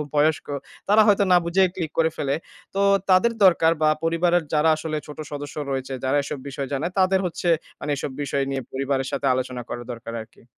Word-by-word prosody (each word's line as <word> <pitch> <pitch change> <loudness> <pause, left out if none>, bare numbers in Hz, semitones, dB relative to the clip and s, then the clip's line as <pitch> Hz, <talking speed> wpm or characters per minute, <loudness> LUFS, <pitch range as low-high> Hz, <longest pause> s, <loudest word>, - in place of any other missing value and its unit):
বয়স্ক, 150 +1 +2 0.4
তারা 210 +2 +6
হয়তো 205 -1 +4
না - - +8
বুঝেই 185 +2 +3
ক্লিক 165 -5 -3
করে 160 0 +4
ফেলে। 140 -1 -1 0.4
তো 195 - 0 0.3
তাদের 185 +6 +5
দরকার 165 -3 +5
বা 155 - +5 0.2
পরিবারের 170 +1 +2
যারা 155 +1 +4
আসলে 155 0 -4
ছোট 150 - -10
সদস্য 145 0 -6
রয়েছে, 135 0 -3
যারা 130 +2 +1
এসব 145 +1 -5
বিষয় 140 0 -4
জানে, 140 +4 -1
তাদের 190 0 +3
হচ্ছে 175 0 -3 0.3
মানে 150 - -4
এসব 135 0 -4
বিষয় 140 0 -1
নিয়ে 135 -1 -2
পরিবারের 135 0 -1
সাথে 140 - -2
আলোচনা 125 -1 -3
করা 120 - -5
দরকার 115 -1 -8
আরকি। 110 - -19
150 Hz, 195 wpm, -23 LUFS, 135-175 Hz, 0.4 s, না